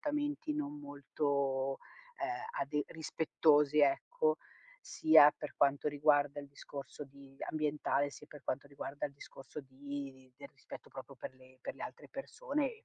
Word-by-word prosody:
comportamenti 295 0 -1
non 295 0 -3
molto, 140 - 0 0.4
ehm, 350 - -1 0.3
ade 150 +1 0
rispettosi, 150 -2 +3
ecco, 465 - +3 0.5
sia 150 - +8
per 150 - -6
quanto 140 +1 +3
riguarda 145 -1 +3
il 140 - -10
discorso 140 +1 -8
di 135 0 -15
ambientale, 150 -2 +1
sia 150 - -11
per 150 -1 -12
quanto 135 +2 -2
riguarda 140 0 -4
il 140 - -12
discorso 140 +1 -9
di 135 0 -7
i 130 - -27
del - - -10
rispetto - - -11
proprio - - -9
per - - -7
le 130 0 -18
per - - -5
le - - -8
altre - - -9
persone 305 - -2
e 455 0 -12
145 Hz, 155 wpm, -35 LUFS, 140-160 Hz, 0.5 s, sia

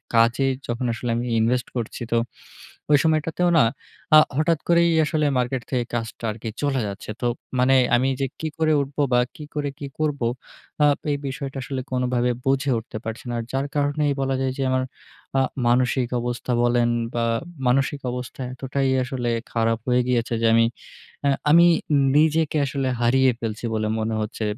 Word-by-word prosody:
কাজে 115 +4 +4 0.2
যখন 120 +2 -2
আসলে 120 +1 -4
আমি 120 - -2
ইনভেস্ট 125 +2 +1
করছি 115 0 -4
তো, 115 - +3 0.7
ঐ - - +6
সময়টাতেও 160 +2 +1
না, - - +6 0.5
আ - - +11 0.2
হঠাৎ 155 0 +2
করেই 170 0 +4
আসলে 155 -1 0
মার্কেট 125 0 -1
থেকে 125 -2 0
কাজটা 115 0 -4
আর 105 - -8
কি 115 - -2
চলে 140 -2 +1
যাচ্ছে। 100 +1 -8
তো 120 - +1 0.3
মানে 130 +1 +4 0.2
আমি 130 +2 +2
যে - - +2
কি 160 - -2
করে 155 -1 +3
উঠবো, 140 +2 -3
বা 125 - +5 0.2
কি 150 - -9
করে, 145 -1 -1
কি 140 - -5
করবো, 145 -5 0 0.6
আ - - +7 0.3
এই 145 - 0
বিষয়টা 135 0 -5
আসলে 130 0 -4
কোনভাবে 125 -1 +1 0.2
বুঝে 135 +1 +1
উঠতে 115 0 -8
পারছি 115 +3 -6
না। - - -2 0.2
যার 135 +1 -1
কারণেই 145 0 +1
বলা 135 0 0
যায় 130 -1 0
যে, 135 - -1
আমার 130 0 +1 0.6
আ - - +4 0.3
মানসিক 125 0 +2
অবস্থা 120 +1 -3
বলেন, 120 0 +3 0.3
বা 115 - +1 0.4
মানসিক 135 +3 +1
অবস্থা 125 +1 -6
এতটাই 135 +1 -1
আসলে 125 -2 -3 0.2
খারাপ 115 -1 +1
হয়ে 125 0 +3
গিয়েছে 120 -2 0
যে, 115 - +3
আমি, 115 0 +5 0.6
আ - - +5 0.2
আমি 170 +3 +7 0.5
নিজেকে 155 0 +3
আসলে 135 -1 -2
হারিয়ে 130 +2 +4
ফেলছি, 110 0 -4
বলে 110 0 0
মনে 110 0 -1
হচ্ছে। 110 +1 -4
130 Hz, 175 wpm, -23 LUFS, 120-145 Hz, 0.7 s, আ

